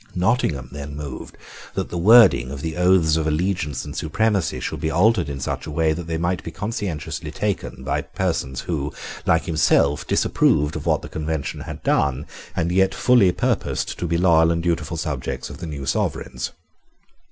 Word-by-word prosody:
Nottingham 90 - 0
then 70 0 -7
moved 75 -3 -7 0.4
that - - -2
the 90 - -3
wording 100 - +6
of 70 0 -6
the 80 -1 -3
oaths 90 -3 +4
of 80 -1 0
allegiance 80 -2 -1
and 75 0 -8
supremacy 100 +3 0
should - - -4
be 80 - -1
altered 90 -1 +3
in 70 -1 -5
such 65 - -3
a - - -5
way 80 +1 +2
that 85 +1 -6
they 80 -1 -2
might 85 +2 -1
be - - -5
conscientiously 85 -6 -4
taken 65 +1 -3
by 65 - -1
persons 80 -8 -2
who, 75 -4 -3 0.4
like 80 - +3
himself, 75 -2 +2
disapproved 75 +1 +2
of 80 - -5
what - - +2
the - - -6
Convention 80 -2 -3
had - - -8
done, 70 0 +1 0.3
and 85 -1 0
yet 95 +1 +2
fully 120 -7 +4
purposed - - -1
to 90 - -2
be 85 +1 +1
loyal 85 -2 +4
and 85 0 0
dutiful 85 -1 -1
subjects 75 -5 -4
of - - -10
the 85 - -6
new 70 -3 -5
sovereigns. 65 -1 -2
80 Hz, 180 wpm, -22 LUFS, 75-90 Hz, 0.4 s, wording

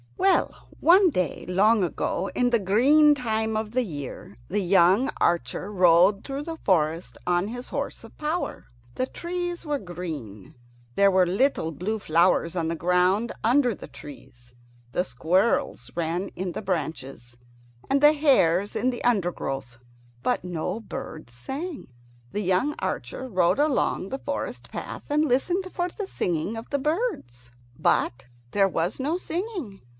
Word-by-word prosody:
Well, 390 - +1
one 365 +3 +6
day 180 - -2
long 205 +3 +4
ago, 180 +2 -2
in 245 0 +2
the 240 - +3
green 275 +10 +5
time 220 -4 -1
of 215 -1 -2
the 255 +2 +1
year, 145 - -7
the 210 - -1
young 190 +6 +4
archer 170 +4 0
rode 185 +1 +5
through 275 +1 -4
the 325 +1 -6
forest 165 - 0
on 175 +2 +2
his 245 +2 -7
horse - - -4
of - - -14
power. 310 +4 -3 0.3
The 255 - 0
trees 350 +4 -4
were 295 -1 0
green; 160 - -7 0.4
there 200 0 +5
were 185 -1 +4
little 195 - +1
blue 195 +9 -3
flowers 170 -1 +2
on 165 -2 0
the 165 - -1
ground 180 +6 +2
under 245 -1 +3
the - - -10
trees; 125 -4 -13 0.4
the 180 - +1
squirrels 175 - 0
ran 170 +3 -2
in 185 -1 -5
the - - -5
branches, 135 -9 -4 0.5
and 275 +1 +2
the 295 +1 +7
hares 205 - +3
in 250 +4 +1
the 245 - -4
undergrowth; 175 - -1 0.5
but - - 0
no 180 +3 -3
birds 155 - -8
sang. 280 - -6 0.4
The 210 - -2
young 190 +10 +1
archer 260 - -4
rode 185 +1 +2
along 285 -9 +1
the 270 - -4
forest 285 +1 -5
path - - -6
and 300 +1 +3
listened 355 +8 0
for 355 -1 -1
the 405 +2 -6
singing 180 - -2
of 225 - -8
the 285 - +1
birds, 290 - -3 0.3
but 125 +2 +1 0.3
there 195 -1 +3
was 175 +5 -2
no 300 +6 0
singing. 350 - -5
200 Hz, 150 wpm, -25 LUFS, 170-275 Hz, 0.5 s, the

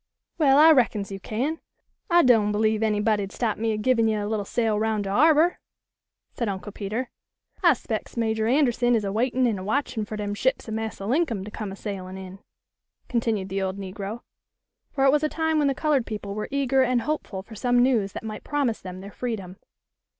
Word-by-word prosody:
Well, 275 -3 +5
I 315 +2 +8
reckons 220 -8 +2
you 195 - -5
can. 265 +11 -2 0.5
I 345 0 +5
doan' 225 -5 +4
believe 215 +1 +1
any 215 -2 +1
body'd 205 -2 0
stop 225 -4 -2
me 225 0 0
a 215 - -1
givin' 230 +1 +2
yo' 210 -2 0
a - - -3
little 210 -2 -2
sail 220 -1 0
'roun' 220 -1 0
de 195 - -4
harbor," 315 - +4 0.7
said 235 -3 -2
Uncle 195 +1 -5
Peter. 215 +5 -4 0.5
"I 340 -4 +6
'spec's 230 -2 -5
Major 220 -1 0
Anderson 245 -2 +3
is 220 - 0
a 195 - -2
waitin' 250 +4 +1
an' 220 -5 0
a - - -6
watchin' 230 +1 -1
fer 215 - -6
dem 205 -1 -3
ships 260 +5 0
of 220 - -4
Massa 220 -2 -4
Linkum 240 - 0
to 210 - -8
come 210 -2 -5
a - - -7
sailin' 190 -2 -6
in," 190 0 -9 0.7
continued 225 -5 -1
the 195 +1 -2
old 190 0 -2
negro; 200 +3 -6 0.7
for 270 -1 +1
it 270 - +6
was 295 +1 +3
a 305 - +1
time 320 -1 0
when 290 - +3
the 275 - +1
colored 285 -4 +1
people 210 -2 -5
were 210 +1 -4
eager 270 -1 +2
and 250 -2 +2
hopeful 260 -11 -3
for 220 - -13
some 245 +3 +2
news 225 -7 +1
that - - -6
might 215 -1 -6
promise 280 -6 -1
them 185 0 -8
their 200 +1 -9
freedom. 200 -7 -5
220 Hz, 210 wpm, -25 LUFS, 205-260 Hz, 0.7 s, I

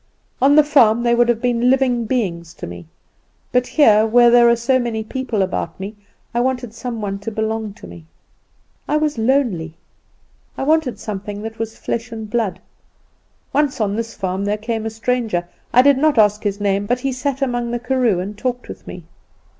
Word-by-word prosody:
On 280 +2 +5
the 305 - +7
farm 240 -6 +4
they 235 0 +3
would 240 0 +3
have 235 0 0
been 245 0 +2
living 255 -3 +2
beings 175 -9 -2
to - - -7
me; 85 -1 -9 0.6
but 250 0 +2
here, 220 -8 +5
where 240 +2 +5
there 240 0 +6
were 235 - +5
so 255 +3 +1
many 230 -3 -2
people 230 -3 -2
about 185 -2 -4
me, 200 +3 -6 0.4
I 240 - 0
wanted 250 -2 -1
some 235 -1 -5
one 195 -1 -3
to 205 - -5
belong 220 -1 -3
to - - -13
me. 85 -2 -12 0.8
I 300 - +1
was 305 -5 -1
lonely. 220 - 0 0.8
I - - -2
wanted 305 -3 +1
something 205 0 -6
that 225 0 -7
was 225 -1 -4
flesh 235 +1 -4
and 220 -1 -6
blood. 210 -5 -1 0.9
Once 290 -3 +1
on 205 -2 0
this 230 0 -4
farm 190 +1 -2
there 205 +1 0
came 225 0 -3
a - - -1
stranger; 225 -5 -1 0.2
I 250 - +6
did 280 -1 +5
not 305 -2 +2
ask 210 -1 +4
his 205 -1 -2
name, 200 0 0
but 245 +2 0
he 270 - -1
sat 270 +1 -2
among 240 -2 -1
the 240 - -1
karoo 245 -5 +1
and 200 +3 -5
talked 245 +3 -4
with - - -10
me. 180 - -8
230 Hz, 195 wpm, -19 LUFS, 210-250 Hz, 0.9 s, the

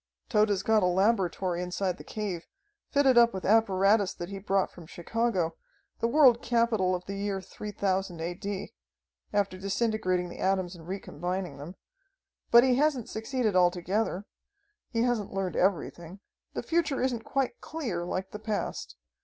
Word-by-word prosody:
"Tode's 210 -4 +2
got 220 0 +3
a 180 - +3
laboratory 185 -2 +1
inside 180 0 -2
the - - -9
cave, 195 -6 -4 0.4
fitted 270 -4 +5
up 235 -3 +5
with 190 - -5
apparatus 200 -1 +3
that 175 - -6
he 200 -1 -6
brought 195 0 0
from 170 -3 -13
Chicago, 180 -2 -1 0.4
the 230 - +1
world 255 -2 +5
capital 230 -6 +2
of 180 0 -6
the 200 - -5
year 200 -1 -2
3000 195 -3 -3
A. 170 +2 -2
D., 200 +1 -5 0.6
after 200 -2 0
disintegrating 195 -3 0
the 175 - -10
atoms 190 -2 0
and 165 -1 -13
recombining 185 -2 -4
them. 160 +6 -8 0.7
But 235 0 +8
he 255 -1 +3
hasn't 280 -5 +1
succeeded 220 -2 -1
altogether. 185 +3 +1 0.6
He 230 -1 0
hasn't 240 -6 -1
learned 195 -2 -2
everything. 180 0 -1 0.4
The - - -3
future 325 -5 0
isn't 245 -3 0
quite 265 -2 -2
clear, 235 - -3
like 185 +2 -3
the 210 - -6
past. 210 - -3
195 Hz, 155 wpm, -29 LUFS, 180-230 Hz, 0.7 s, But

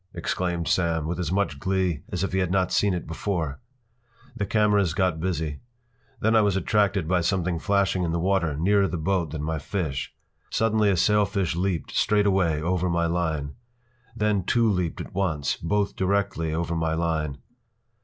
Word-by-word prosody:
” - - -38
exclaimed 85 -2 -2
Sam, 85 -3 +1
with 85 +2 -3
as 85 -3 -2
much 100 +1 0
glee 95 -5 0
as 90 0 -2
if 95 - -1
he 95 - +2
had 90 -2 0
not 95 0 +1
seen 100 -3 +2
it 85 - -4
before. 80 -3 -3 0.8
The 100 -4 -2
cameras 105 -5 +2
got 90 -4 +1
busy. 80 -4 -2 0.6
Then 110 +1 +3
I 110 - +6
was 100 -2 +2
attracted 100 -2 +1
by 90 0 +2
something 90 -1 0
flashing 100 -1 +1
in 85 -2 0
the 85 - 0
water 85 -5 +1
nearer 100 +4 +3
the 90 - -3
boat 85 0 0
than 75 0 -5
my 80 0 -2
fish. 75 -5 -3 0.4
Suddenly 110 -2 +2
a 95 - +2
sailfish 100 -2 +2
leaped, 90 -1 -1
straightaway, 95 -6 +2
over 90 +3 0
my 85 0 +1
line. 80 -4 -1 0.6
Then 105 -4 +1
two 115 +4 +2
leaped 90 -5 -1
at - - -9
once, 85 -7 0
both 100 +4 -1
directly 95 -4 0
over 85 +1 -2
my 80 -1 0
line. 80 -4 -1
90 Hz, 175 wpm, -25 LUFS, 80-100 Hz, 0.8 s, I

